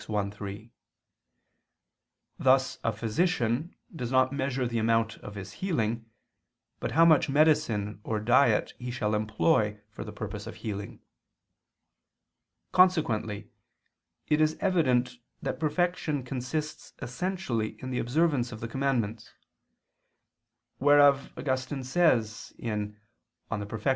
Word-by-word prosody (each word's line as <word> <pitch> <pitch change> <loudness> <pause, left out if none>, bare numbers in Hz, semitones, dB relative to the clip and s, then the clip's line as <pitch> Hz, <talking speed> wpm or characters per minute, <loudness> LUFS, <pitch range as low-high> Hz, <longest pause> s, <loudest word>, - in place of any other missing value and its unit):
i, 105 -2 0
3); 105 +2 -8 1.7
thus 130 0 +3
a - - +2
physician 125 - 0 0.2
does 125 -5 -4
not 130 0 +3
measure 135 -2 -1
the 115 -1 -1
amount 115 0 +1
of 105 - -9
his 100 0 -7
healing, 115 - -2 0.7
but - - -3
how 165 +1 +6
much 155 -4 +5
medicine 135 -9 +2
or 110 -1 -1
diet 120 0 +3
he 125 0 -5
shall 115 -3 -1
employ 110 0 +1
for - - -7
the - - -8
purpose - - -6
of - - -7
healing. 100 -2 -6 1.7
Consequently 115 - +2 0.8
it 150 0 +2
is 155 0 +2
evident 130 -10 +2 0.2
that 130 - -4
perfection 155 -2 0
consists 135 +5 -4
essentially 130 - -3
in 130 - -6
the 125 - -1
observance 135 -2 +1
of 110 - -7
the 115 - -4
commandments; 115 -4 -1 1.5
wherefore 145 0 +5
Augustine 130 0 -2
says 125 -8 +1
(De 105 -3 -2 0.6
Perf. 105 +1 -4
125 Hz, 115 wpm, -28 LUFS, 110-145 Hz, 1.7 s, how